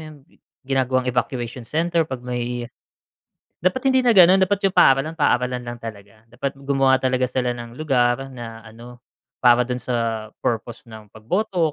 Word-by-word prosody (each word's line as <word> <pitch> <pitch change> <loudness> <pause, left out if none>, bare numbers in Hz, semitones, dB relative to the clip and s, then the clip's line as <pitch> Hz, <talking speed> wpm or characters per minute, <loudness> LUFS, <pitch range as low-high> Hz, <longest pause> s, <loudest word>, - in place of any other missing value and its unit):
'yon, 155 -1 -10
gi - - -28 0.3
ginagawang 130 -1 0
evacuation 120 0 -3
center 165 0 0
'pag 130 -2 -6
may 120 -1 -3 0.9
dapat 190 - 0
hindi 260 - +3
na 235 -2 +4
gano'n. 185 0 +7
Dapat 200 +1 0
'yung 190 - -12
paaralan, 135 +5 +4
paaralan 125 -3 +1
lang 120 0 -6
talaga. 110 -1 -10
Dapat 135 +3 -4
gumawa 135 -1 +2
talaga 130 0 +1
sila 125 0 -1
ng 120 0 -9
lugar 135 -2 0
na 115 -3 -9
ano, 120 +2 -13 0.4
para 120 0 +5
do'n 125 -1 -3
sa 115 -3 -2
purpose 115 0 -3
ng 110 -2 -13
pagboto 170 - -1
125 Hz, 160 wpm, -22 LUFS, 120-145 Hz, 0.9 s, gano'n